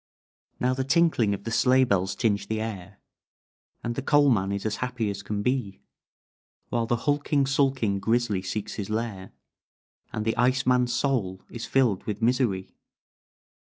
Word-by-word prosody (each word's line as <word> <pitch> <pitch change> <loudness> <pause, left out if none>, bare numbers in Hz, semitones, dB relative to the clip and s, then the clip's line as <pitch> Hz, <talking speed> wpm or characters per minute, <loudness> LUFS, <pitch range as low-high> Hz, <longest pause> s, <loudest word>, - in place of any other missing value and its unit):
"Now 125 +1 +2
the 130 +1 -1
tinkling 135 -8 +2
of 100 - -11
the 115 - -4
sleigh 130 +2 +4
bells 95 -5 0
tinge 100 -4 0
the 110 0 -2
air, 100 -3 -6 0.9
And 120 - -2
the 135 - -3
coal 145 +1 +4
man 100 -4 +1
is 100 +1 -3
as 110 - -1
happy 125 -4 -2
as 100 0 -6
can 100 +1 -3
be; 125 -6 -2 0.9
While 115 -1 0
the 120 - +2
hulking, 145 -1 +2
sulking, 135 -7 +1
grizzly 110 -2 +1
seeks 100 +2 -4
his 100 - -6
lair, 110 -4 -3 0.8
And 110 - -3
the 110 - +1
ice 130 +2 +2
man's 125 -1 +3
soul 120 -8 -1
is 120 - -6
filled 120 -8 +2
with 105 -1 -3
misery. 115 -5 +1
115 Hz, 165 wpm, -26 LUFS, 100-130 Hz, 0.9 s, sleigh